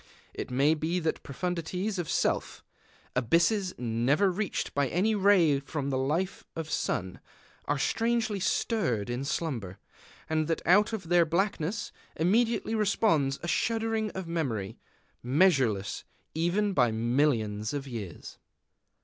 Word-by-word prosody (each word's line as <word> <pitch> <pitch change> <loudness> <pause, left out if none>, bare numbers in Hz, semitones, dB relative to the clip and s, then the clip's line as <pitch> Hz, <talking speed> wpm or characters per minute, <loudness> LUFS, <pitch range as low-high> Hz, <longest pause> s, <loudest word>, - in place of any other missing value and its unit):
It - - -5
may 135 +5 +3
be 160 +3 -1
that 160 -2 -2
profundities 180 +6 -3
of 170 - -3
Self, - - -1 0.5
abysses 170 - +2
never 125 - +2
reached 195 +1 -3
by 140 -1 +1
any 190 - +1
ray 190 -8 +4
from 140 0 -4
the 130 - 0
life 160 +8 -1
of 160 -1 -5
sun, 90 -1 -2 0.5
are 145 - 0
strangely 225 +6 0
stirred 125 - 0
in 120 +2 -3
slumber, 125 - -3 0.5
and 155 -1 0
that 165 - -1
out 205 +5 +5
of 195 -7 -5
their 175 -1 +5
blackness 195 +4 -1 0.2
immediately 225 +6 +1
responds 200 -10 +2
a - - -3
shuddering 225 +4 0
of 190 -1 -4
memory, 115 - -3 0.4
measureless 130 - +2 0.3
even 185 +6 +1
by 125 -7 +3
millions 110 -2 0
of 145 -1 -4
years. 110 -9 -8
160 Hz, 130 wpm, -29 LUFS, 130-195 Hz, 0.5 s, out